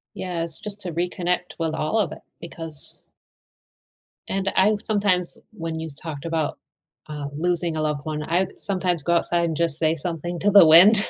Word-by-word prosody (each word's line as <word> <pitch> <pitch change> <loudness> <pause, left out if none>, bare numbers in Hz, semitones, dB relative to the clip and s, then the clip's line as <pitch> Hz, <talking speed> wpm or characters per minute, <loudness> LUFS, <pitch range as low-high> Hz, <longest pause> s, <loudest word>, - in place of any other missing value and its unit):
Yes, 170 -3 -3
just 205 -1 -6
to 175 - -4
reconnect 180 +1 -2
with 160 -1 -1
all 160 +9 0
of 180 -7 +1
it - - -13 0.2
because 165 -3 -8 1.3
and 195 0 -1
I 210 +3 +4
sometimes 200 -5 +1
when 165 -5 -5
you 160 - -4
talked 155 -2 -6
about, 160 -3 -1 0.5
uh, 150 -2 -5
losing 175 0 0
a 155 - -1
loved 150 -2 -1
one, 155 -1 -3
I 175 +5 +1
sometimes 185 -4 -1
go 170 +4 +1
outside 170 0 +2
and 160 -2 -2
just 165 -2 0
say 160 0 +2
something 175 +1 -4
to 205 0 +2
the 195 -4 +9
wind 200 +7 +8
170 Hz, 175 wpm, -24 LUFS, 160-185 Hz, 1.3 s, the